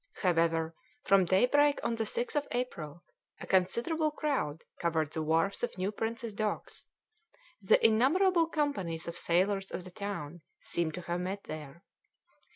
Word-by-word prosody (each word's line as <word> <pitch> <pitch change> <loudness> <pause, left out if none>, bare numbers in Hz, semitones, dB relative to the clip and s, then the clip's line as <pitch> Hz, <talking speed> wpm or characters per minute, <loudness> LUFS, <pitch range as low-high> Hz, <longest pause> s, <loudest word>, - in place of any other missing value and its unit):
However, 165 -2 +2 0.3
from 195 -2 +5
daybreak 280 +11 +4
on - - 0
the 225 -1 -1
6th 240 +5 -3
of 290 -1 0
April 170 -10 -4 0.4
a - - -7
considerable 235 - +1
crowd 275 - -2 0.2
covered 160 -3 0
the 160 - -2
wharfs 165 +5 +1
of 240 - -2
New 185 +2 -1
Prince's 225 +1 -4
Docks 210 0 -3 0.7
the 190 - +4
innumerable 330 - +4
companies 195 - -2
of 170 - -4
sailors 195 +3 +1
of 180 - -5
the 185 - -10
town 175 -5 -5 0.2
seemed 165 -2 -2
to 180 - -5
have 175 0 -3
met 195 +2 -4
there. 155 +2 -8
195 Hz, 150 wpm, -31 LUFS, 170-240 Hz, 0.7 s, from